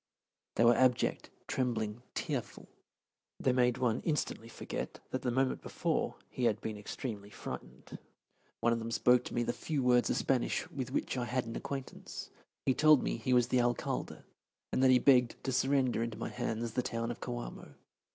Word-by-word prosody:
They 115 - +4
were 120 - +8
abject, 125 0 +2 0.2
trembling, 115 -3 -1
tearful. - - -3 0.7
They 130 - +2
made 125 -1 +3
one 120 -2 +1
instantly 150 -7 -1
forget - - -5
that 130 - -2
the 125 - 0
moment 130 +2 +1
before - - -1
he 125 - -2
had 110 -3 +2
been 110 - -4
extremely 105 0 -6
frightened. - - -8 0.6
One 115 0 +4
of 115 - -1
them 115 0 -4
spoke 125 +1 +4
to - - -6
me 120 - +2
the 120 - -1
few 145 +2 -2
words 125 -1 +4
of - - +1
Spanish 130 -3 0
with 130 -3 -4
which - - -1
I 125 - 0
had 125 +1 -1
an 115 - -6
acquaintance. 135 -2 -6 0.3
He 130 - +4
told 155 +1 +6
me - - -1
he 115 +3 -2
was 125 -1 +4
the 125 - +3
Alcalde, 120 0 -1 0.5
and - - +2
that 130 - +6
he 130 - +7
begged 125 -2 +5
to 135 - -1
surrender 130 -1 +2
into 115 -2 -3
my - - -3
hands 115 -1 -2
the 125 - 0
town 115 -1 -2
of 120 - -7
Coamo. - - -6
125 Hz, 185 wpm, -33 LUFS, 115-130 Hz, 0.7 s, were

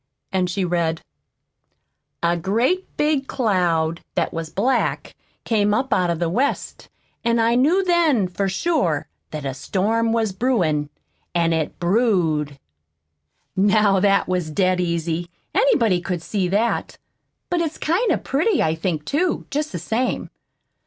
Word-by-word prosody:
And 185 -2 0
she 185 +1 -1
read: 170 -2 -1 1.2
"A 170 0 +3
great 230 - 0
big 295 -2 +1
cloud 170 -8 0
That - - 0
was 165 -1 -4
black 245 +10 0 0.3
Came 210 -2 +2
up 260 +4 0
Out 180 -1 +2
of 170 - 0
the 170 +1 0
West. 255 +12 -2 0.3
An' 235 0 +2
I 230 0 +3
knew 305 +11 +3
Then 330 - +3
For 195 +2 -2
sure 220 - 0 0.2
That 150 -2 -6
a 135 - -2
storm 220 - 0
was 225 -2 +1
brewin'. 180 - 0 0.5
An' 170 -1 +2
it 160 -2 -2
brewed." 175 - +1 1.0
"Now 200 0 +4
that 200 +1 +3
was 180 -3 -1
dead 185 +2 +1
easy 170 0 -2 0.2
anybody 235 - +3
could 175 -2 -3
see 195 -2 -1
that. 210 +6 0 0.5
But 350 -1 +1
it's 320 -2 -2
kind 375 +7 +1
of - - 0
pretty, 325 - +1
I 155 - +1
think, 160 -2 -3
too, 340 - 0
jest 300 +2 -2
the 180 - -4
same. 225 +9 -2
195 Hz, 145 wpm, -22 LUFS, 170-250 Hz, 1.2 s, Now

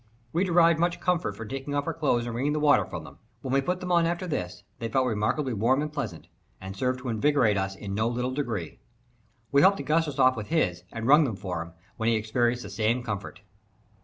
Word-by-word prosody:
We 170 +3 +2
derived 170 -3 +4
much 175 0 +1
comfort 180 -1 0
from 115 - -7
taking 135 +3 -4
off 145 0 0
our 165 - -2
clothes 135 -7 0
and 120 - -4
wringing 135 +5 0
the 150 - 0
water 150 -1 +4
from - - -6
them. - - -13 0.2
When 130 - -3
we 135 - +4
put 180 +6 -2
them 180 0 -3
on 170 -1 +4
after 175 +2 -2
this, 90 - -4 0.2
they 115 - -3
felt 130 +3 +2
remarkably 120 +4 0
warm 115 +6 +2
and 150 0 -5
pleasant, 90 - -5 0.3
and 95 +1 -8
served 130 +3 -1
to 130 - -4
invigorate 120 -2 +2
us 95 0 -2
in 100 0 -6
no 110 +3 +1
little 125 +2 -1
degree. 115 - -4 0.7
We 140 - +5
helped 195 +1 +5
Augustus 150 0 0
off 130 0 +5
with 105 -3 -6
his, 95 - 0
and 115 0 -5
wrung 150 +5 +7
them 115 -6 -2
for 90 -4 -4
him, 85 0 -9 0.2
when 110 0 +1
he 115 - +3
experienced 120 +3 0
the - - -8
same 115 +3 0
comfort. 100 -4 -5
130 Hz, 230 wpm, -27 LUFS, 110-150 Hz, 0.7 s, wrung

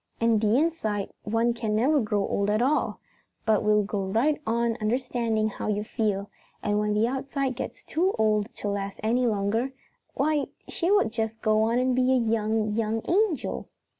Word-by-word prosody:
And 230 -2 +3
the 215 +2 +3
inside 245 -11 -1
one 230 +2 +1
can 225 -3 -2
never 280 +7 +3
grow 205 -2 0
old 200 0 0
at 210 +1 +2
all, 275 +5 +1 0.5
but 220 -2 +3
will 210 0 +3
go 200 -1 -2
right 275 +10 +1
on 235 0 +1
understanding 230 -1 0
how - - -5
you 210 0 0
feel, 205 -2 -1 0.4
and 210 0 +1
when 210 0 0
the 215 +2 +3
outside 270 0 -2
gets - - -6
too 365 +4 0
old 215 0 +1
to - - -4
last 200 -1 -3
any 240 +3 +2
longer, 220 +5 0 0.4
why, 295 0 +1 0.2
she 345 - -1
will 405 0 +4
just 225 0 -3
go 215 0 +3
and 250 +2 +2
be 255 +1 +3
a - - +4
young, 220 -2 +1
young 225 0 -1
angel." 380 -4 0
225 Hz, 175 wpm, -26 LUFS, 210-255 Hz, 0.5 s, will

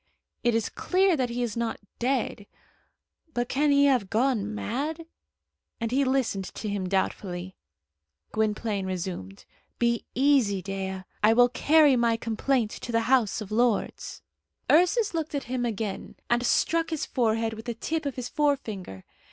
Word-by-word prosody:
"It 240 -1 +3
is 225 -2 +1
clear 375 -1 +2
that 255 -4 0
he 240 +1 -2
is 230 -4 -3
not 235 -1 -2 0.2
dead; 240 -5 -1 0.9
but 240 0 0
can 290 +4 +1
he 280 0 +5
have 250 -9 +2
gone 220 -2 +1
mad?" 300 +10 -3 0.7
and 230 -1 -2
he 275 +2 +3
listened 255 -7 0
to 215 - -5
him 200 -3 -2
doubtfully. 185 -1 -2 0.8
Gwynplaine 210 -2 -1
resumed. 175 - -5 0.3
"Be 235 -1 +1
easy, 260 -7 +3
Dea; 190 -1 -4 0.2
I 215 +2 +5
will 245 +1 +5
carry 295 +2 +5
my 235 -1 +2
complaint 230 +1 0
to 240 - -6
the 230 0 +2
House 230 -3 +2
of 210 -1 -8
Lords." 235 0 0 0.5
Ursus 365 +7 +4
looked 320 -2 -2
at 280 - -2
him 250 0 -2
again, 210 -3 -4 0.2
and 240 0 +3
struck 330 +5 +2
his 320 -3 -2
forehead 225 -2 0
with 220 +1 -9
the 235 -2 -3
tip 315 +5 -2
of 275 - -4
his 250 -2 -4
forefinger. 220 - -2
235 Hz, 155 wpm, -27 LUFS, 210-275 Hz, 0.9 s, he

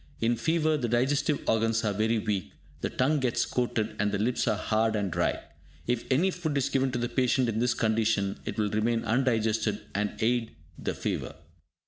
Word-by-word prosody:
In 115 +1 +2
fever 155 +5 +1
the 120 -5 -2
digestive 135 +5 +1
organs 115 +1 +2
are 105 - +1
very 110 +3 +1
weak, 105 -4 -2 0.3
the - - -2
tongue 145 +4 +1
gets 125 -3 +1
coated, 115 -3 -1
and 105 0 +1
the 100 - 0
lips 120 +5 0
are 110 -2 +2
hard 110 +1 +1
and 100 -3 -1
dry. - - 0 0.5
If 120 -1 -1
any 165 +9 +3
food 160 -5 -2
is 135 - +1
given 135 -1 +1
to - - 0
the 120 0 -1
patient 125 +1 +2
in 110 -1 -1
this 120 0 +2
condition, 110 -3 +1
it - - -5
will 105 -2 0
remain 115 +2 +1
undigested 110 -3 +1
and 105 0 -1
aid 115 -5 0 0.2
the - - -3
fever. - - -3
115 Hz, 190 wpm, -28 LUFS, 110-130 Hz, 0.5 s, any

